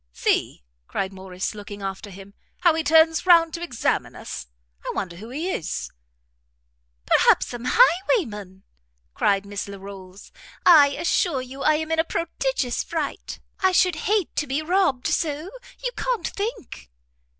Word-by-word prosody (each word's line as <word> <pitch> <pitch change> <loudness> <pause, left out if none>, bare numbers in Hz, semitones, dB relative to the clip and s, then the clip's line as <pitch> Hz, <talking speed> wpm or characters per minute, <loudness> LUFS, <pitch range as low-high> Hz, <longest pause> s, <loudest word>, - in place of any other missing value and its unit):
"See," - - 0 0.2
cried 195 0 -3
Morrice, 190 0 -5
looking 205 -1 -9
after 195 +2 -5
him, 195 +1 -12 0.3
"how 345 -2 +5
he 320 0 -1
turns 320 +3 +4
round 335 -2 +6
to 340 - -5
examine 320 -9 -1
us! - - -7 0.4
I - - -3
wonder 175 -2 -4
who 220 +5 -10
he 315 +9 -3
is." 165 - -4 1.1
"Perhaps - - +4
some 240 0 -7
highwayman!" 285 - +2 0.5
cried 200 -1 +1
Miss 205 0 -5
Larolles; 195 -1 -11 0.3
"I 310 -5 +8
assure 280 -1 0
you 265 +2 -9
I 310 - +4
am 315 +1 -3
in 325 - +1
a - - +4
prodigious 335 - -2
fright; 315 -4 -4 0.2
I 375 -1 +3
should 360 -1 +4
hate 415 -5 +1
to 295 - 0
be 280 +4 -1
robbed 335 -7 +1
so 310 +3 -1 0.3
you - - -1
can't - - -1
think." 405 - -6
290 Hz, 150 wpm, -24 LUFS, -, 1.1 s, I